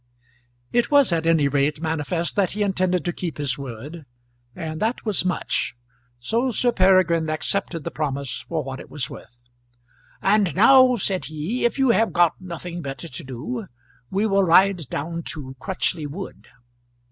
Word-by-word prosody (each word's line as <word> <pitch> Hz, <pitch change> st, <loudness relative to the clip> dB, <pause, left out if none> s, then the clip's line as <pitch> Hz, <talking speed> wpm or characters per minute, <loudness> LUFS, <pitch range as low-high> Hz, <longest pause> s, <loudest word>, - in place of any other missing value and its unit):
It 240 Hz, -1 st, +2 dB
was 285 Hz, -7 st, +5 dB
at 165 Hz, -1 st, 0 dB
any 160 Hz, -4 st, +4 dB
rate 140 Hz, +1 st, +1 dB
manifest 160 Hz, +1 st, -2 dB
that 200 Hz, -3 st, +1 dB
he 210 Hz, +1 st, 0 dB
intended 185 Hz, -4 st, 0 dB
to 175 Hz, -, -1 dB
keep 170 Hz, -2 st, -5 dB
his 140 Hz, -3 st, 0 dB
word, 140 Hz, +4 st, -8 dB, 0.5 s
and 155 Hz, -1 st, -5 dB
that 225 Hz, +3 st, -1 dB
was 210 Hz, -5 st, +1 dB
much; 180 Hz, -9 st, -1 dB, 0.4 s
so 230 Hz, -, 0 dB
Sir 245 Hz, +1 st, +2 dB
Peregrine 185 Hz, -5 st, +3 dB
accepted 165 Hz, +1 st, -2 dB
the -, -, -4 dB
promise 140 Hz, -3 st, -3 dB
for 160 Hz, -2 st, -1 dB
what 130 Hz, 0 st, -6 dB
it -, -, -11 dB
was 145 Hz, -, -3 dB
worth. 120 Hz, -, -12 dB, 0.8 s
"And 195 Hz, -5 st, +2 dB
now," 255 Hz, +4 st, +7 dB
said 190 Hz, -3 st, 0 dB
he, 160 Hz, +12 st, -3 dB
"if 235 Hz, -, +1 dB
you 265 Hz, -3 st, +4 dB
have 225 Hz, +1 st, +2 dB
got 175 Hz, -1 st, +4 dB
nothing 175 Hz, -1 st, -6 dB
better 140 Hz, +3 st, -6 dB
to 130 Hz, -, -5 dB
do, 155 Hz, -, -5 dB, 0.4 s
we 200 Hz, +3 st, 0 dB
will 195 Hz, -2 st, +3 dB
ride 180 Hz, -4 st, +4 dB
down 165 Hz, +5 st, -3 dB
to 130 Hz, -3 st, -8 dB
Crutchley 175 Hz, -2 st, -1 dB
Wood." 185 Hz, +7 st, -8 dB
170 Hz, 165 wpm, -23 LUFS, 150-200 Hz, 0.8 s, now